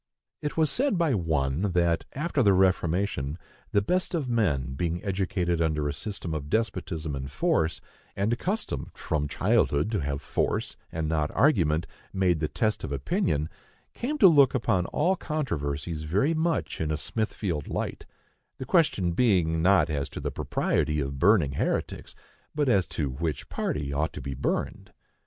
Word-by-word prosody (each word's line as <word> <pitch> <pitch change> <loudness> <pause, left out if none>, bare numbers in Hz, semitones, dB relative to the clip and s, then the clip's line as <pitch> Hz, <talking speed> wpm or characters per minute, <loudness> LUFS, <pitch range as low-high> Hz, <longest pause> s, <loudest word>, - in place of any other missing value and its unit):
It 150 - -4
was 155 -2 +3
said 265 -6 +1
by 165 -5 +2
one 80 - 0
that, 85 -1 +2
after 150 0 0
the 100 -5 +5
Reformation, 90 -5 +1 0.3
the 100 - +3
best 180 - 0
of 150 -6 -1
men, 80 - 0
being 85 +4 -2
educated 90 -3 0
under 75 -2 +1
a 70 - -2
system 95 -1 -5
of 75 -2 -4
despotism 90 -8 -1
and 70 0 -5
force, 80 +3 +1 0.3
and 100 +4 +1
accustomed 180 - -2
from 75 -2 -2
childhood 75 +6 +1
to 105 - 0
have 70 -1 -2
force, - - -1 0.2
and 80 -1 -2
not 75 -1 0
argument, 85 - +3 0.3
made 90 -4 +2
the 75 - 0
test 110 +3 -1
of - - -4
opinion, 70 +2 0 0.5
came 290 +6 -3
to 200 - +8
look 140 -7 +6
upon 110 -7 +1
all 180 +5 +1
controversies 85 - -3
very 100 - +1
much 165 - -1
in 80 - -1
a 75 - 0
Smithfield 100 -7 -2
light,—the 130 - -7
question 135 - +2
being 85 -6 +2
not 90 -3 +5
as 70 -3 -2
to - - -7
the - - -3
propriety 75 0 0
of 70 -1 -3
burning 85 -5 +4
heretics, 70 - -2 0.4
but 150 -2 +1
as 100 -7 +3
to 70 -4 -2
which 75 +1 -3
party 70 -1 -2
ought 75 +1 -1
to - - -6
be 70 - -4
burned. 65 - -3
85 Hz, 160 wpm, -27 LUFS, 75-115 Hz, 0.5 s, to